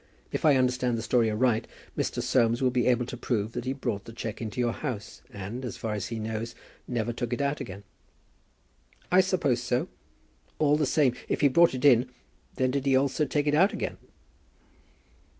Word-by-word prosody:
If -, -, -2 dB
I 150 Hz, -3 st, +6 dB
understand 125 Hz, -2 st, +1 dB
the 115 Hz, -, -4 dB
story 115 Hz, -1 st, +2 dB
aright, 110 Hz, +1 st, +1 dB, 0.3 s
Mr. -, -, -2 dB
Soames 120 Hz, -2 st, +2 dB
will 130 Hz, -1 st, +2 dB
be 125 Hz, 0 st, +1 dB
able 125 Hz, -1 st, +3 dB
to 125 Hz, -, -6 dB
prove 115 Hz, -3 st, -2 dB
that 120 Hz, +1 st, -5 dB
he 130 Hz, -, -1 dB
brought 120 Hz, -7 st, -3 dB
the -, -, -9 dB
cheque 115 Hz, -1 st, -6 dB
into 110 Hz, +1 st, -5 dB
your 120 Hz, -1 st, +1 dB
house, 115 Hz, -8 st, -5 dB
and, 105 Hz, +6 st, -6 dB
as 125 Hz, -, -5 dB
far 110 Hz, -1 st, -3 dB
as 105 Hz, -2 st, -3 dB
he 115 Hz, -, -4 dB
knows, 110 Hz, +1 st, -4 dB, 0.3 s
never 120 Hz, -1 st, -1 dB
took 120 Hz, 0 st, -4 dB
it 120 Hz, -, -2 dB
out 140 Hz, +1 st, -1 dB
again." 100 Hz, -1 st, -7 dB, 1.3 s
"I 185 Hz, +1 st, +7 dB
suppose 170 Hz, -10 st, +1 dB
so; 125 Hz, 0 st, -1 dB, 0.7 s
all 150 Hz, -1 st, +3 dB
the 150 Hz, -2 st, +1 dB
same, 140 Hz, -4 st, +3 dB, 0.2 s
if -, -, 0 dB
he 145 Hz, -, +6 dB
brought 170 Hz, +1 st, +5 dB
it 130 Hz, -, -2 dB
in, 125 Hz, -2 st, +5 dB, 0.5 s
then 130 Hz, -1 st, +1 dB
did 140 Hz, +1 st, -1 dB
he 135 Hz, -, +4 dB
also 135 Hz, +2 st, +2 dB
take 145 Hz, 0 st, 0 dB
it 145 Hz, -, +1 dB
out 185 Hz, +7 st, +4 dB
again." -, -, -3 dB
125 Hz, 200 wpm, -27 LUFS, 115-135 Hz, 1.3 s, I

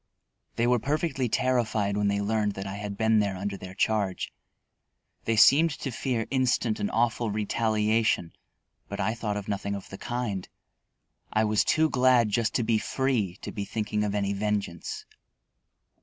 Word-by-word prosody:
They 115 Hz, -, +1 dB
were 125 Hz, 0 st, +3 dB
perfectly 140 Hz, -1 st, -1 dB
terrified 110 Hz, -5 st, +1 dB
when 105 Hz, 0 st, +1 dB
they 100 Hz, 0 st, +1 dB
learned 105 Hz, 0 st, 0 dB
that 95 Hz, 0 st, -6 dB
I 95 Hz, -, -5 dB
had 100 Hz, -1 st, -5 dB
been 110 Hz, -1 st, +3 dB
there 100 Hz, -2 st, 0 dB
under 100 Hz, +1 st, -3 dB
their 95 Hz, -1 st, -9 dB
charge. 100 Hz, -2 st, 0 dB, 0.9 s
They 115 Hz, -, +1 dB
seemed 140 Hz, +9 st, +6 dB
to 135 Hz, -, -4 dB
fear 120 Hz, -2 st, -1 dB
instant 125 Hz, -4 st, +1 dB
and 105 Hz, -, -1 dB
awful 115 Hz, 0 st, +1 dB
retaliation; 110 Hz, -3 st, +1 dB, 0.6 s
but 100 Hz, -, -5 dB
I 110 Hz, +3 st, +1 dB
thought 105 Hz, -3 st, -3 dB
of 100 Hz, -, -6 dB
nothing 100 Hz, -1 st, -2 dB
of 100 Hz, -, -9 dB
the 95 Hz, -, -8 dB
kind. 120 Hz, -6 st, -3 dB, 0.8 s
I 110 Hz, -, +2 dB
was 105 Hz, -1 st, +2 dB
too 160 Hz, 0 st, +3 dB
glad 125 Hz, -5 st, +4 dB
just 110 Hz, +2 st, 0 dB
to 120 Hz, -, +2 dB
be 110 Hz, -1 st, +2 dB
free 120 Hz, -10 st, 0 dB
to -, -, -5 dB
be 100 Hz, -, -4 dB
thinking 105 Hz, 0 st, -2 dB
of 105 Hz, -1 st, -1 dB
any 100 Hz, -1 st, 0 dB
vengeance. 100 Hz, -4 st, -3 dB
110 Hz, 170 wpm, -27 LUFS, 100-120 Hz, 0.9 s, seemed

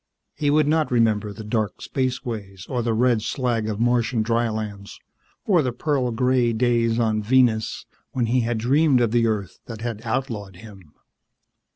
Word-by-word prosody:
He 145 Hz, -, -1 dB
would 150 Hz, 0 st, +3 dB
not 155 Hz, 0 st, +2 dB
remember 110 Hz, -4 st, +1 dB
the 100 Hz, +2 st, -9 dB
dark 105 Hz, -1 st, -2 dB
spaceways 115 Hz, -8 st, -4 dB
or 125 Hz, -2 st, -2 dB
the 115 Hz, 0 st, -1 dB
red 120 Hz, -1 st, +2 dB
slag 115 Hz, -2 st, -1 dB
of 105 Hz, -1 st, -3 dB
Martian 120 Hz, -1 st, +1 dB
drylands 110 Hz, -3 st, -2 dB, 0.5 s
or 185 Hz, -6 st, +4 dB
the 130 Hz, -3 st, -1 dB
pearl 130 Hz, 0 st, -1 dB
gray 125 Hz, 0 st, +1 dB
days 115 Hz, -1 st, +1 dB
on 110 Hz, -2 st, +1 dB
Venus 115 Hz, -1 st, +2 dB, 0.3 s
when 125 Hz, -2 st, 0 dB
he 125 Hz, +3 st, +1 dB
had 120 Hz, -1 st, -1 dB
dreamed 135 Hz, +4 st, +3 dB
of 120 Hz, -3 st, +1 dB
the 115 Hz, -1 st, +3 dB
Earth 105 Hz, -5 st, -3 dB
that 115 Hz, -2 st, -8 dB
had 115 Hz, -2 st, -4 dB
outlawed 115 Hz, -5 st, -3 dB
him. 95 Hz, -6 st, -14 dB
115 Hz, 165 wpm, -23 LUFS, 110-125 Hz, 0.5 s, or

